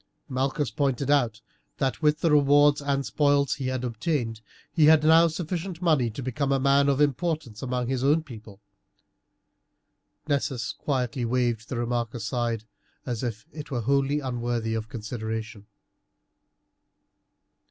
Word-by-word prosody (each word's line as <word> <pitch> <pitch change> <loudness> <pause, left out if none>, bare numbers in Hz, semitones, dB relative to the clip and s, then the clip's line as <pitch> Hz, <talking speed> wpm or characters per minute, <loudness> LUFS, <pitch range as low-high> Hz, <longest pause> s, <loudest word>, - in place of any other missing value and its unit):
Malchus 135 +2 -1
pointed 140 -1 0
out 120 -7 +1 0.4
that, 135 +2 -1
with 150 0 +2
the 165 - +2
rewards 145 0 +5
and 140 -1 -1
spoils 145 -2 +2
he 135 -2 -4
had 130 -1 -2
obtained, 120 -2 -2 0.3
he 155 - +4
had 155 0 +6
now 165 +2 +6
sufficient 170 +2 -4
money 155 -9 +2
to 120 +5 -7
become 135 +3 -1
a 135 - +2
man 140 +1 +3
of 140 0 +1
importance 150 -5 -1
among 125 -1 -2
his 130 0 -1
own 150 +4 +3
people. 110 -7 -12 1.7
Nessus 135 -5 -1
quietly 130 -2 -2
waved 120 -2 -1
the 125 - -3
remark 120 -1 -2
aside 115 0 -2 0.4
as 120 -4 -3
if 115 -1 -4
it 150 -2 -8
were 125 -3 -2
wholly 140 +4 +1
unworthy 120 -3 -2
of 110 0 -4
consideration. 110 -3 -5
130 Hz, 140 wpm, -26 LUFS, 120-145 Hz, 1.7 s, had